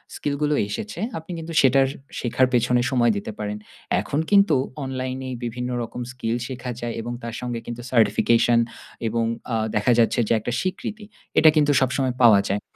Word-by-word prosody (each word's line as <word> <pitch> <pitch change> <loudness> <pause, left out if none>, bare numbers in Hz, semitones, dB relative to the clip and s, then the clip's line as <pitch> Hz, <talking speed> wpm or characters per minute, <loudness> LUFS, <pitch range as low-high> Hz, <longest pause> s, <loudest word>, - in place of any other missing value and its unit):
স্কিলগুলো 145 +1 -1
এসেছে, 210 - -5 0.2
আপনি 160 +3 -8
কিন্তু 165 0 -6
সেটার 135 0 +4 0.3
শেখার 130 +2 +2
পেছনে 125 0 +3
সময় 120 -3 +3
দিতে 100 - -5
পারেন। 105 0 -3 0.4
এখন 145 - -2
কিন্তু 200 -4 +5 0.3
অনলাইনেই 130 0 -4
বিভিন্ন 125 +1 -3
রকম 120 +1 -7
স্কিল 115 -2 -2
শেখা 125 -1 -5
যায় 120 -1 -3
এবং 120 +2 -5
তার 115 -1 -5
সঙ্গে 120 -1 -3
কিন্তু 120 0 -6
certification 115 +1 +3 0.5
এবং 115 +1 0 0.3
আ - - +2 0.2
দেখা 105 +4 +3
যাচ্ছে 115 0 +3
যে - - +2
একটা 115 - -4
স্বীকৃতি, 205 +3 -4 0.3
এটা 155 - +8
কিন্তু 150 -1 +4
সবসময় 130 -1 0
পাওয়া 105 -4 +7
যায়। 100 +1 0
125 Hz, 165 wpm, -23 LUFS, 115-135 Hz, 0.5 s, এটা